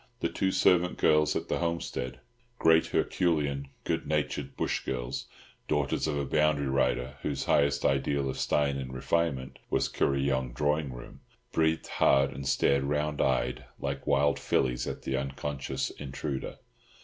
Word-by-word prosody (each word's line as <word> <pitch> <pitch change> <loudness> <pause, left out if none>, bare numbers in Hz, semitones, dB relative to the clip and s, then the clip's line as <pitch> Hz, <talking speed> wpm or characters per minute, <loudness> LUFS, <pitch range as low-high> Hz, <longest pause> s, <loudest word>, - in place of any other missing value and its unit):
The - - 0
two 95 - 0
servant 90 -1 +3
girls 75 0 +3
at - - -2
the - - -1
homestead—great 85 - 0
herculean, 75 -6 0 0.2
good - - -2
natured 75 -1 -2
bush - - -1
girls, 65 0 -3 0.4
daughters - - 0
of 75 -2 -1
a 70 - -1
boundary 75 -2 +2
rider, 65 0 0
whose 70 -2 -2
highest 70 0 +2
ideal 70 +1 +1
of 65 - -3
style 70 -2 +1
and 65 -1 -5
refinement 65 0 -1
was - - +1
Kuryong 65 -2 0
drawing 75 -1 0
room—breathed 80 +6 -3
hard 70 0 +3
and 70 0 -6
stared 70 0 +2
round 75 +1 0
eyed, 65 -1 0
like 70 -1 -4
wild 70 +1 +3
fillies, 60 -2 0
at - - -5
the 65 - -1
unconscious 70 +1 -3
intruder. 70 0 -5
70 Hz, 140 wpm, -29 LUFS, 65-75 Hz, 0.4 s, servant